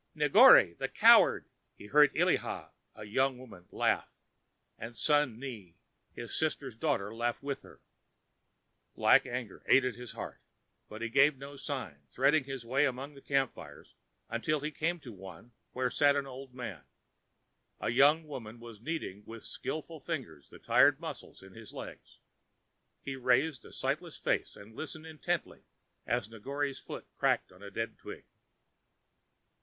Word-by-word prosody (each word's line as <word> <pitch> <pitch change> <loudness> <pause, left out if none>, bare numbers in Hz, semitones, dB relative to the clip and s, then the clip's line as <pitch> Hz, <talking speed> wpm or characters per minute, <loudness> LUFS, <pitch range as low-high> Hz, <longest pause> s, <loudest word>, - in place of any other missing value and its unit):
"Negore, 85 - +7
the - - -1
Coward," - - +6 0.3
he - - -13
heard 145 +6 +5
Illiha, - - 0 0.2
a 110 - -9
young 130 +5 +1
woman, 100 -9 -13
laugh, - - 0 0.7
and 115 +2 -7
Sun 145 -6 +2
ne, 115 -10 -8 0.4
his 120 -1 -7
sister's 140 -6 -2
daughter, 115 -6 -1
laughed 120 +3 -2
with 140 -1 -3
her. - - -16 1.2
Black - - +5
anger 120 -4 -5
ate 135 -1 +6
at 125 - -1
his 120 0 -9
heart; - - -7 0.5
but 110 +2 -7
he 115 - -2
gave 135 +4 +4
no 140 +2 -9
sign, 130 - -5
threading 140 - +3
his 135 -3 -6
way 135 +5 +2
among 135 +3 -5
the 140 - -14
camp 135 -2 +1
fires 75 -1 -13 0.3
until 140 +6 -1
he 150 +1 -3
came 165 +4 -1
to 120 -5 -10
one 95 +3 -12 0.2
where 125 0 -1
sat 145 -1 +4
an 140 -1 -1
old 130 -1 -10
man. 115 - -6 1.0
A - - -2
young 145 +6 +5
woman 120 -5 -8
was 115 -3 -11
kneading 120 - -4
with 115 0 -9
skilful 160 +1 -6
fingers 125 - -6
the - - -13
tired - - +4
muscles - - -8
of 95 0 -14
his 115 -1 -12
legs. - - -10 0.9
He 135 - -4
raised 130 +1 +1
a - - -12
sightless - - -3
face - - -1
and 110 +2 -14
listened 155 +2 -7
intently 160 +2 -3 0.5
as 120 -3 0
Negore's 135 +6 -4
foot - - -8
crackled 90 +1 0
a 100 - -8
dead 115 +2 -4
twig. - - -10
130 Hz, 155 wpm, -31 LUFS, 110-145 Hz, 1.2 s, Negore